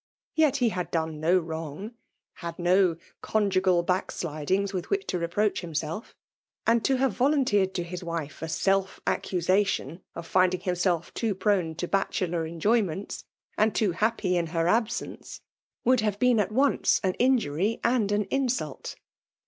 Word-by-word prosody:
Yet 310 -3 +3
he 245 -4 +2
had 180 -4 -3
done 160 -2 -2
no 175 +4 +3
wttmg; 160 +6 -6 0.4
.had 170 -1 -6
no 180 0 +3 0.3
conjugal, 190 -4 +2
backsjidings 185 +1 -1
with 185 -2 -4
which 400 0 0
ta 180 - -2
re^ 170 - -1
pjToach 205 +4 0
himself; 165 - -4 0.5
and 230 -1 +3
to 270 - +3
Iwve 260 -1 +2
yohinleetedi 250 -9 +2 0.2
ta. 175 - -10
Us 180 - -4
wife 165 -4 -5
a - - -2
self^accusation 190 -1 0
of 170 - -6
finding 185 0 +2
idmself 180 -2 0
tnoc^ 215 -5 -1
prone 185 -6 +1
to 175 - -3
bacheIov*en)oynients, 185 +1 -1 0.3
and 215 0 +3
too 210 -4 +2
hiappf 220 +4 0
in 175 -2 +1
her 165 0 -1
absence^ 225 +5 -1 0.5
would 255 +1 +4
have 210 -2 0
been 245 0 +3
at 210 - 0
once 270 +5 +3
nxi. 185 -2 0
injury 225 - +1
and 235 -4 +2
an 205 0 +2
insult. 250 - -2
190 Hz, 150 wpm, -27 LUFS, 170-220 Hz, 0.5 s, would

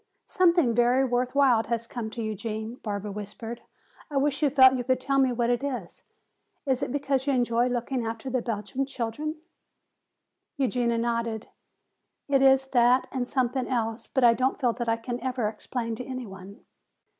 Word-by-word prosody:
"Something 345 - +3
very 245 +3 +3
worth 250 +1 -1
while 260 -5 +4
has 230 0 -2
come 230 -2 -5
to 230 +1 -5
you, 215 0 -2
Gene," 220 +3 -5
Barbara 205 -1 -4
whispered. 210 +3 -7 0.5
"I 290 - -2
wish 285 +1 +1
you 295 - +4
felt 260 -1 +7
you 250 -1 -1
could 255 +1 +1
tell 275 +1 +1
me 260 -1 +3
what 240 0 +1
it 245 +2 0
is. 250 -11 -5 0.6
Is 265 -1 +1
it 280 - -2
because 275 -1 -1
you 280 - +3
enjoy 240 -1 +2
looking 245 +1 -2
after 225 +2 -5
the 255 -1 0
Belgian 235 +4 -3
children?" 275 +5 -3 1.2
Eugenia 245 -3 +1
nodded. 230 -1 -2 0.8
"It 275 -2 +3
is 270 0 +5
that 245 0 +4
and 250 -2 -2
something 255 -1 0
else, 225 -2 -2
but 265 - 0
I 235 -1 +7
don't 255 +4 0
feel 245 -4 +2
that 240 -1 -3
I 230 - +2
can 240 +1 -5
ever 250 -3 -1
explain 230 +2 -4
to 250 - -5
any 255 -1 -5
one." 195 0 -11
245 Hz, 180 wpm, -27 LUFS, 230-265 Hz, 1.2 s, felt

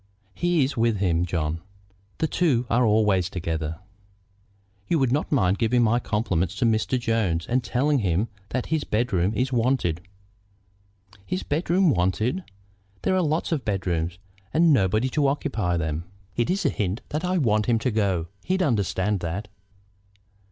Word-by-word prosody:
"He 175 - +2
is 130 - -1
with 115 -2 +2
him, 90 -3 +1
John. 80 -1 -2 0.6
The - - +1
two 145 -7 +1
are 125 +2 +4
always 105 -5 +3
together." 80 -4 -3 1.1
"You 170 - +2
would 135 -4 +2
not 145 +4 0
mind 100 -9 +2
giving 120 +1 +3
my 115 +2 +3
compliments 95 -6 -1
to 105 - 0
Mr. 115 +3 +1
Jones, 110 -9 0
and 125 +1 0
telling 140 +4 +1
him 95 +1 +1 0.2
that 130 0 -2
his 155 -2 +1
bedroom 105 -5 0
is 130 +3 0
wanted?" 115 -9 +1 1.2
"His 185 - -3
bedroom 175 +3 +2
wanted! 105 - 0 0.6
There - - +2
are 185 - +3
lots 155 +1 0
of 150 -6 0
bedrooms, 90 -4 -1 0.3
and 165 0 +4
nobody 110 +1 +2
to 140 +2 +1
occupy 115 -11 -1
them." 80 0 -2 0.3
"It's 180 +11 0
a - - +5
hint 105 0 -2
that 150 +3 -3
I 185 +1 +1
want 110 -8 +2
him 120 -2 +3
to 125 +3 -1
go; 100 -6 0 0.2
he'd 185 0 0
understand 105 - 0
that." 90 +5 -4
115 Hz, 155 wpm, -25 LUFS, 95-135 Hz, 1.2 s, a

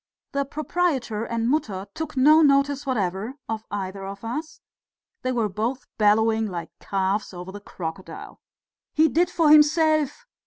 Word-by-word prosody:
The 280 -1 -1
proprietor 280 -7 -1
and 230 0 -1
Mutter 210 -9 -1
took 315 -3 -6
no 305 +5 +6
notice 280 -1 +3
whatever 210 0 -2
of 220 -1 -4
either 195 -1 -4
of 195 +1 -8
us; 300 +8 -5 0.6
they 255 - -1
were 235 -4 +1
both 225 +7 -3
bellowing 220 +1 +3
like 170 -4 -6
calves 195 0 -1
over 180 +1 -7
the 205 +1 -9
crocodile. 185 -1 -8 0.5
"He 315 +1 +5
did 345 +4 +2
for 325 -4 +3
himself! 305 -1 +4
235 Hz, 145 wpm, -24 LUFS, 200-295 Hz, 0.6 s, no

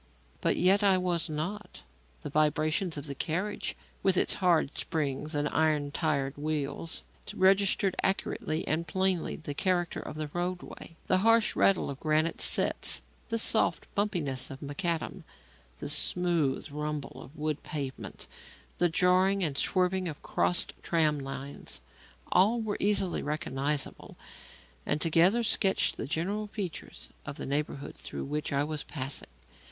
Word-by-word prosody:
But - - +2
yet 190 +3 +4
I 195 -2 +5
was 175 -3 0
not. 165 - -5 0.4
The - - -5
vibrations 155 +3 +1
of 145 - -5
the 140 - -4
carriage, 180 +9 -2 0.3
with 190 -2 +2
its - - +3
hard 170 -6 +3
springs 150 0 -2
and 145 0 +1
iron 150 -2 +1
tired 145 -3 -1
wheels, 155 +1 -2 0.3
registered 195 0 +3
accurately 165 -4 -1
and 165 +2 0
plainly 190 -3 0
the 150 -3 -5
character 175 +2 0
of - - -7
the 155 -1 -4
roadway. 175 -1 -4
The 185 - +3
harsh 225 +2 +4
rattle 195 - +3
of 135 - -8
granite 155 +1 +1
setts, - - +3 0.2
the 230 - 0
soft 175 -7 +3
bumpiness 165 -11 -1
of 135 - -8
macadam, 160 +3 -3 0.5
the - - -5
smooth 155 -1 +1
rumble 150 -1 -4
of 145 - -13
wood 155 -1 -2
pavement, 140 -3 -5 0.5
the 175 - +4
jarring 185 +3 +3
and 150 -5 0
swerving 185 +4 +1
of 155 -3 -7
crossed 175 0 +1
tram 155 -3 +2
lines; 135 - -6 0.5
all 205 +6 +4
were 220 -2 -2
easily 195 -3 +1
recognizable 145 -1 -2 0.7
and 145 - 0
together 170 +9 +4
sketched 195 -3 +2
the - - -5
general 195 +8 -1
features 195 -7 -6
of 140 - -6
the - - -6
neighbourhood 140 0 -3
through - - -5
which 150 +3 -3
I 140 0 +2
was 150 0 -2
passing. 135 - -3
160 Hz, 140 wpm, -30 LUFS, 145-185 Hz, 0.7 s, I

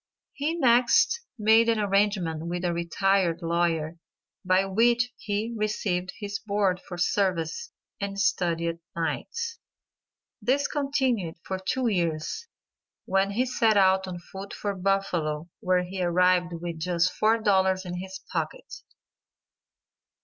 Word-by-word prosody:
He 300 +4 -1
next 250 - +4 0.2
made 225 +1 +5
an 225 -1 +2
arrangement 195 -6 +1
with 175 +1 -3
a 175 - +1
retired 170 0 +1
lawyer, 165 -1 0 0.4
by 185 +1 +3
which 240 +5 +2
he 215 +2 -3
received 195 -4 -1
his 200 -1 -4
board 200 -3 0
for 175 - -8
services, 185 - 0 0.3
and 200 0 -4
studied 170 -3 0 0.2
nights. 460 - -3 0.8
This 265 +6 +2
continued 265 - 0
for 190 0 -4
two 250 +7 -1
years, 170 - -1 0.6
when 195 +1 +2
he 235 +6 0
set 230 -4 +2
out 190 -1 +4
on 180 -1 -5
foot 190 +3 -9
for 205 -1 -2
Buffalo 180 -5 -1
where 180 -1 +2
he 185 +1 -5
arrived 180 0 +3
with 170 -1 -5
just 175 +2 +1
$4 195 -4 +3
in 180 0 -4
his 190 +1 -7
pocket. - - -4
190 Hz, 125 wpm, -26 LUFS, 175-215 Hz, 0.8 s, made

